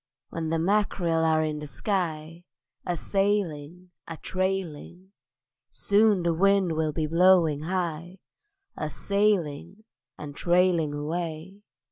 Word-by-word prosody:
When 165 Hz, -1 st, -4 dB
the 165 Hz, -, 0 dB
mack'rel 175 Hz, -2 st, +1 dB
are 160 Hz, -1 st, +2 dB
in 155 Hz, -1 st, -3 dB
the 150 Hz, -, -7 dB
sky, 165 Hz, -, -3 dB, 0.4 s
A 175 Hz, -1 st, -1 dB
sailing, 180 Hz, -4 st, -2 dB, 0.2 s
a 165 Hz, -, -7 dB
trailing; 185 Hz, -1 st, -4 dB, 0.6 s
Soon 205 Hz, -2 st, +2 dB
the 170 Hz, -1 st, +1 dB
wind 195 Hz, +1 st, +3 dB
will 160 Hz, -1 st, 0 dB
be 155 Hz, +1 st, -2 dB
blowing 165 Hz, -2 st, +4 dB
high: 175 Hz, 0 st, -3 dB, 0.6 s
A 155 Hz, -, -4 dB
sailing 195 Hz, +1 st, -1 dB, 0.3 s
and 145 Hz, -1 st, -8 dB
trailing 175 Hz, -4 st, +2 dB
away. 165 Hz, +5 st, -5 dB
170 Hz, 115 wpm, -26 LUFS, 155-190 Hz, 0.6 s, blowing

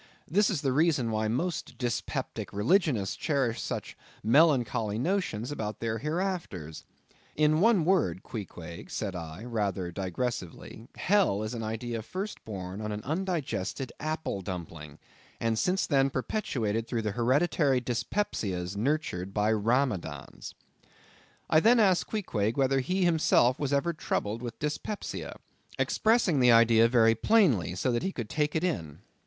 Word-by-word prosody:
This 200 Hz, +7 st, +3 dB
is 175 Hz, -8 st, -1 dB
the 135 Hz, -, +1 dB
reason 145 Hz, -5 st, +2 dB
why 110 Hz, 0 st, 0 dB
most 160 Hz, +11 st, -2 dB
dyspeptic 120 Hz, -3 st, -3 dB
religionists 115 Hz, -, +1 dB
cherish 130 Hz, -7 st, 0 dB
such -, -, -4 dB, 0.3 s
melancholy 120 Hz, -4 st, +3 dB
notions 145 Hz, -, -1 dB
about 110 Hz, -7 st, -4 dB
their 115 Hz, -1 st, -2 dB
hereafters. 150 Hz, -, -3 dB, 0.5 s
In 155 Hz, +1 st, +3 dB
one 210 Hz, -6 st, +4 dB
word, 145 Hz, -, +1 dB
Queequeg, 85 Hz, -6 st, -8 dB
said 100 Hz, -4 st, -3 dB
I, 80 Hz, +2 st, -7 dB
rather 100 Hz, -6 st, -2 dB
digressively; 100 Hz, +3 st, -4 dB
hell 185 Hz, -, +2 dB
is 110 Hz, +2 st, -4 dB
an 115 Hz, -, -4 dB
idea 115 Hz, +1 st, -3 dB
first 190 Hz, -, -6 dB
born 95 Hz, -1 st, -6 dB
on 105 Hz, 0 st, -3 dB
an 105 Hz, 0 st, -5 dB
undigested 150 Hz, -, -2 dB
apple 155 Hz, -9 st, -3 dB
dumpling; 85 Hz, -5 st, -7 dB, 0.4 s
and 115 Hz, -1 st, 0 dB
since 185 Hz, +2 st, +1 dB
then 135 Hz, -2 st, +3 dB
perpetuated 115 Hz, -, -2 dB
through 115 Hz, -3 st, -2 dB
the 105 Hz, -, -1 dB
hereditary 135 Hz, -, +2 dB
dyspepsias 110 Hz, -, -2 dB
nurtured 105 Hz, -, -2 dB
by 105 Hz, +1 st, +2 dB
Ramadans. 110 Hz, -, -1 dB, 0.9 s
I 155 Hz, -, +5 dB
then 235 Hz, +7 st, +5 dB
asked 190 Hz, -5 st, +3 dB
Queequeg 115 Hz, -, -1 dB
whether 135 Hz, 0 st, +3 dB
he 185 Hz, +8 st, 0 dB
himself 155 Hz, -7 st, +3 dB
was 145 Hz, -2 st, -1 dB
ever 145 Hz, +5 st, +1 dB
troubled 110 Hz, -7 st, -2 dB
with 120 Hz, -2 st, -6 dB
dyspepsia; 150 Hz, +7 st, -4 dB, 0.4 s
expressing 215 Hz, -, +2 dB
the 125 Hz, -1 st, +6 dB
idea 115 Hz, 0 st, +6 dB
very 115 Hz, -2 st, +5 dB
plainly, 115 Hz, -, +3 dB
so 125 Hz, +7 st, 0 dB
that 120 Hz, -, 0 dB
he 190 Hz, -, -1 dB
could 120 Hz, -, -6 dB
take 150 Hz, -1 st, 0 dB
it 160 Hz, -, +1 dB
in. 80 Hz, -, -3 dB
120 Hz, 140 wpm, -29 LUFS, 105-155 Hz, 0.9 s, the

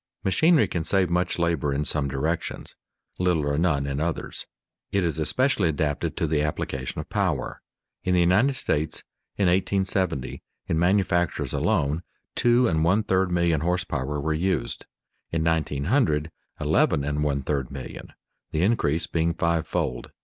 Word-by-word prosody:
_ -, -, -25 dB
Machinery 145 Hz, -, +4 dB
can 85 Hz, -2 st, -2 dB
save 95 Hz, 0 st, +1 dB
much 90 Hz, +1 st, +1 dB
labor 85 Hz, -4 st, 0 dB
in 70 Hz, +2 st, -1 dB
some 70 Hz, -1 st, 0 dB
directions, 75 Hz, +5 st, -3 dB, 0.4 s
little 90 Hz, -5 st, +2 dB
or 70 Hz, -, +1 dB
none 75 Hz, -5 st, +1 dB
in 70 Hz, 0 st, -2 dB
others. 80 Hz, +1 st, -3 dB, 0.4 s
It 100 Hz, -2 st, +1 dB
is 80 Hz, -2 st, -1 dB
especially 105 Hz, -, +2 dB
adapted 75 Hz, -1 st, -1 dB
to -, -, +1 dB
the 75 Hz, -1 st, +1 dB
application 65 Hz, -3 st, -3 dB
of -, -, -5 dB
power. -, -, -1 dB, 0.4 s
In 90 Hz, 0 st, +1 dB
the -, -, +4 dB
United 100 Hz, +11 st, +4 dB
States, 80 Hz, -, -1 dB, 0.3 s
in 100 Hz, -, +2 dB
1870, 95 Hz, -5 st, 0 dB, 0.3 s
in 80 Hz, -, 0 dB
manufactures 90 Hz, -1 st, +1 dB
alone, 75 Hz, -1 st, +1 dB, 0.3 s
two 120 Hz, +1 st, +4 dB
and 80 Hz, -5 st, +1 dB
one 95 Hz, +6 st, +3 dB
third 95 Hz, -2 st, +1 dB
million 85 Hz, -3 st, +2 dB
horse 90 Hz, +2 st, 0 dB
power 70 Hz, +1 st, -3 dB
were 80 Hz, +2 st, 0 dB
used; 90 Hz, +4 st, -1 dB, 0.4 s
in 80 Hz, -1 st, 0 dB
1900, 80 Hz, -, +1 dB, 0.3 s
eleven 70 Hz, -, +2 dB
and 75 Hz, +1 st, -1 dB
one 70 Hz, -2 st, 0 dB
third 70 Hz, -4 st, -1 dB
million, 65 Hz, -2 st, -8 dB, 0.4 s
the 80 Hz, -, 0 dB
increase 85 Hz, -7 st, +1 dB
being 85 Hz, +1 st, 0 dB
five 85 Hz, -2 st, 0 dB
fold. -, -, -2 dB
85 Hz, 155 wpm, -25 LUFS, 75-90 Hz, 0.4 s, Machinery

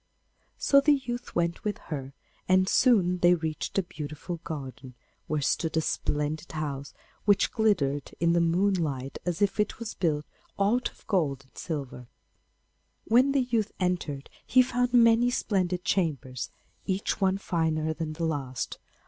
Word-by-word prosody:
So 280 Hz, 0 st, +5 dB
the 295 Hz, +1 st, +5 dB
youth 250 Hz, -2 st, -5 dB
went 170 Hz, 0 st, 0 dB
with 210 Hz, -2 st, -1 dB
her, 140 Hz, -3 st, -7 dB, 0.3 s
and 185 Hz, 0 st, +4 dB
soon 190 Hz, -7 st, +4 dB
they 175 Hz, 0 st, +6 dB
reached 160 Hz, +1 st, -4 dB
a 195 Hz, -, +3 dB
beautiful 155 Hz, +1 st, -6 dB
garden, 135 Hz, -4 st, -7 dB, 0.3 s
where 150 Hz, -1 st, -1 dB
stood 160 Hz, +3 st, 0 dB
a -, -, +4 dB
splendid 150 Hz, +2 st, -2 dB
house, 140 Hz, -3 st, -4 dB, 0.3 s
which 205 Hz, -1 st, +4 dB
glittered 145 Hz, -, +1 dB
in 170 Hz, 0 st, +3 dB
the 170 Hz, -, +3 dB
moonlight 165 Hz, -6 st, 0 dB
as 175 Hz, +3 st, 0 dB
if 200 Hz, +1 st, 0 dB
it 210 Hz, -, 0 dB
was 230 Hz, -1 st, -5 dB
all -, -, -42 dB
built 150 Hz, -4 st, +1 dB, 0.3 s
out 225 Hz, +5 st, +2 dB
of -, -, -24 dB
gold 145 Hz, -, 0 dB
and 130 Hz, -, -31 dB
silver. 135 Hz, -6 st, -5 dB, 1.0 s
When 250 Hz, +5 st, +4 dB
the 275 Hz, -1 st, +3 dB
youth 230 Hz, -4 st, 0 dB
entered 175 Hz, -7 st, -2 dB
he 255 Hz, 0 st, +5 dB
found 245 Hz, 0 st, 0 dB
many 235 Hz, 0 st, +5 dB
splendid 185 Hz, -6 st, 0 dB
chambers, 135 Hz, -, -1 dB, 0.4 s
each 195 Hz, +2 st, -1 dB
one 190 Hz, 0 st, +3 dB
finer 160 Hz, -4 st, 0 dB
than 155 Hz, -1 st, -4 dB
the 165 Hz, +1 st, -2 dB
last. 135 Hz, -6 st, -3 dB
170 Hz, 155 wpm, -28 LUFS, 150-205 Hz, 1.0 s, they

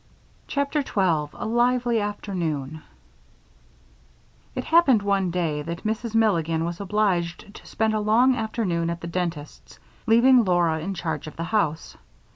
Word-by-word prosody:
CHAPTER 285 Hz, +1 st, -1 dB
12 170 Hz, -, 0 dB
A -, -, -5 dB
Lively 240 Hz, 0 st, +1 dB
Afternoon 165 Hz, -8 st, -4 dB, 1.7 s
It 255 Hz, -, -3 dB
happened 275 Hz, -10 st, +4 dB
one 195 Hz, -2 st, +1 dB
day 165 Hz, -4 st, -1 dB
that 170 Hz, +3 st, -6 dB
Mrs. 225 Hz, +1 st, -3 dB
Milligan 165 Hz, -7 st, +2 dB
was 170 Hz, +2 st, -5 dB
obliged 195 Hz, -2 st, -1 dB
to -, -, -13 dB
spend 220 Hz, 0 st, 0 dB
a 215 Hz, -, 0 dB
long 235 Hz, +5 st, +3 dB
afternoon 215 Hz, -7 st, -2 dB
at 170 Hz, 0 st, -4 dB
the -, -, -6 dB
dentist's, 170 Hz, -3 st, -5 dB, 0.3 s
leaving 240 Hz, +2 st, +6 dB
Laura 175 Hz, -4 st, +1 dB
in 190 Hz, +5 st, -4 dB
charge 160 Hz, -4 st, -4 dB
of 155 Hz, -, -9 dB
the 165 Hz, -, -4 dB
house. 170 Hz, -5 st, -1 dB
195 Hz, 140 wpm, -24 LUFS, 165-225 Hz, 1.7 s, leaving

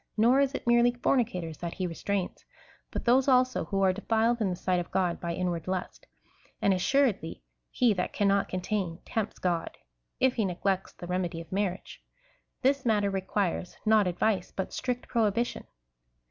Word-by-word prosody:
Nor 240 Hz, +5 st, +5 dB
is 280 Hz, 0 st, +2 dB
it -, -, -5 dB
merely 240 Hz, 0 st, +5 dB
fornicators 195 Hz, -, 0 dB
that 170 Hz, -1 st, -5 dB
he 185 Hz, -, -2 dB
restrains, 180 Hz, +2 st, -3 dB, 0.5 s
but -, -, -5 dB
those 255 Hz, +3 st, +4 dB
also 255 Hz, -7 st, +3 dB
who 195 Hz, +3 st, 0 dB
are 190 Hz, -1 st, +4 dB
defiled 225 Hz, +3 st, +1 dB
in 205 Hz, -, +2 dB
the 180 Hz, -, -2 dB
sight 180 Hz, 0 st, 0 dB
of 175 Hz, -, -5 dB
God 180 Hz, -3 st, 0 dB
by 170 Hz, -1 st, -2 dB
inward 175 Hz, -2 st, -2 dB
lust; 185 Hz, -1 st, -4 dB, 0.5 s
and 200 Hz, -, +3 dB
assuredly 195 Hz, -, +1 dB, 0.3 s
he 240 Hz, -3 st, +3 dB
that 180 Hz, -2 st, -2 dB
cannot 200 Hz, -1 st, +2 dB
contain 185 Hz, -2 st, -2 dB
tempts 220 Hz, -2 st, -3 dB
God, 175 Hz, -2 st, -2 dB, 0.4 s
if 260 Hz, -1 st, +3 dB
he 220 Hz, -4 st, 0 dB
neglects 190 Hz, +1 st, -1 dB
the -, -, -9 dB
remedy 180 Hz, -2 st, -2 dB
of 165 Hz, -, -10 dB
marriage. 195 Hz, -1 st, -3 dB, 0.6 s
This 275 Hz, +1 st, +3 dB
matter 210 Hz, -4 st, +2 dB
requires 190 Hz, -1 st, -2 dB
— -, -, -33 dB
not 215 Hz, -2 st, +4 dB
advice, 185 Hz, +1 st, 0 dB
but 190 Hz, -, -4 dB
strict 250 Hz, -1 st, -3 dB
prohibition. 230 Hz, +1 st, 0 dB
195 Hz, 170 wpm, -29 LUFS, 180-235 Hz, 0.6 s, Nor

